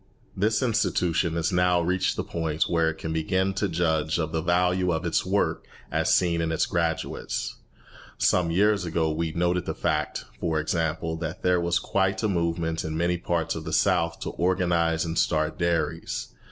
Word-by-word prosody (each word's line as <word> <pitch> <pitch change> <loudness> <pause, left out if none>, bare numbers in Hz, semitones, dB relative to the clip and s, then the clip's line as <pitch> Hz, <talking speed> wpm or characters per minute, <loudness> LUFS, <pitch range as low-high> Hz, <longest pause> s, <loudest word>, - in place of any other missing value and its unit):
This 110 +4 +1
institution 90 -7 +1
has 85 -1 0
now 90 0 +3
reached 90 +2 0
the - - -2
point 80 -2 -1
where 85 -2 +1
it 80 - -4
can 80 0 -4
begin 95 +4 0
to 100 0 -1
judge 80 -1 +1
of 80 -2 -2
the 80 -1 -1
value 90 +1 +2
of 80 -1 -2
its - - +1
work - - 0 0.2
as - - +1
seen 85 -2 +3
in 80 0 -1
its 80 - +1
graduates. 85 -2 -2 0.6
Some 90 -2 +2
years 100 +3 +3
ago 80 -2 0
we 80 +1 -2
noted 90 +1 0
the - - -2
fact, - - -1
for 80 -2 0
example, 80 +1 -1
that 80 0 -5
there 90 -1 +3
was 85 0 +1
quite 95 0 0
a - - +3
movement 85 -3 -1
in 80 0 -3
many 85 +1 +1
parts 85 -1 -1
of - - -5
the - - -5
South 85 0 +2
to - - -3
organise 85 -2 +1
and 80 0 -1
start 80 -1 0
dairies. 85 -1 -1
85 Hz, 180 wpm, -26 LUFS, 80-90 Hz, 0.6 s, now